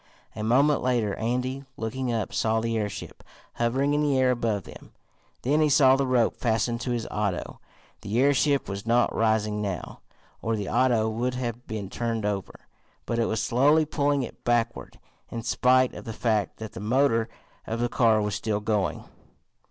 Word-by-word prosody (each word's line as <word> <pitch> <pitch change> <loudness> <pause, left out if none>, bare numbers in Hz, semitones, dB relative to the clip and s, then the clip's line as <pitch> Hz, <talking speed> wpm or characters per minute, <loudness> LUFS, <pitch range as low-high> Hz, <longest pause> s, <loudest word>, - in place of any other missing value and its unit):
A - - -5
moment 140 +6 +3
later 120 -5 +1
Andy, 125 +4 -2
looking 120 +3 -3
up, 115 -2 -2
saw 110 0 +1
the 115 0 -1
airship 105 -3 -4 0.3
hovering 130 +5 +1
in 150 - +2
the 145 -3 +2
air 130 -1 +4
above 115 -6 -1
him. - - -13 0.5
Then 145 +5 +2
he 155 - +3
saw 135 -2 +6
the 135 0 0
rope 125 -3 +2
fast 115 0 0
to 125 - -4
his 120 -2 -1
auto. 100 -4 -2 0.4
The 110 +4 -1
airship 140 +1 +3
was 100 +2 -6
not 120 +1 +3
rising 110 -1 +1
now, 95 -4 -4 0.4
or 115 0 -1
the 105 -2 -4
auto 120 -4 +2
would 120 +3 -2
have 120 -1 -4
been 110 -3 -4
turned 115 +1 -3
over, 100 -3 -3 0.4
but 115 - -1
it 115 - +2
was 110 0 -1
slowly 145 +6 +4
pulling 145 -2 0
it - - -9
backward, 120 -1 -1 0.3
in 115 -1 -5
spite 130 +2 +3
of - - -9
the 115 - -5
fact 110 -3 0
that 110 -1 -7
the - - -8
motor 115 +1 +2 0.4
of 115 +1 -3
the 120 - +1
car 115 -3 +3
was 105 0 -2
still 105 0 -1
going. 105 -2 -1
115 Hz, 180 wpm, -26 LUFS, 110-130 Hz, 0.5 s, saw